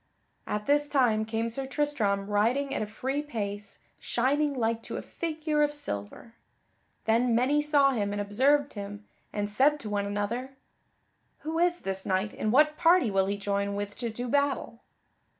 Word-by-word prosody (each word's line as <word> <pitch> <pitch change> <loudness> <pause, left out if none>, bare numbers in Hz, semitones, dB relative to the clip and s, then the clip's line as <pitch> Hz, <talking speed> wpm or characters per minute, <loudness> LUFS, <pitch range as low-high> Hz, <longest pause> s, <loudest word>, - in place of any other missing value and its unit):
At 210 0 -2
this 290 +1 +3
time 240 -7 +2
came 225 +1 -1
Sir 265 +4 -1
Tristram, 260 -9 0
riding 235 +7 +1
at - - -1
a 215 - -2
free 265 +7 -2
pace, 205 -7 -5 0.2
shining 280 +4 +1
like 230 -2 0
to - - -5
a - - -4
figure 310 -2 -2
of 295 0 +3
silver. 105 - -6 0.7
Then 230 +1 +3
many 270 +5 +3
saw 290 -2 +4
him 205 -5 -1
and 205 - -3
observed 270 +8 +2
him 205 0 -7 0.3
and 205 0 -2
said 275 +8 +3
to 215 - -6
one 200 -1 0
another: 230 +6 -3 0.9
"Who 320 +2 -2
is 350 0 +2
this 190 0 -3
knight, 190 +2 -1
and 215 - -1
what 300 +4 +4
party 340 - +4
will 195 -1 +2
he 200 +1 -1
join 200 0 -1
with 205 0 -4
to 235 -1 -3
do 245 +3 -5
battle?" 280 -3 0
235 Hz, 170 wpm, -28 LUFS, 205-285 Hz, 0.9 s, saw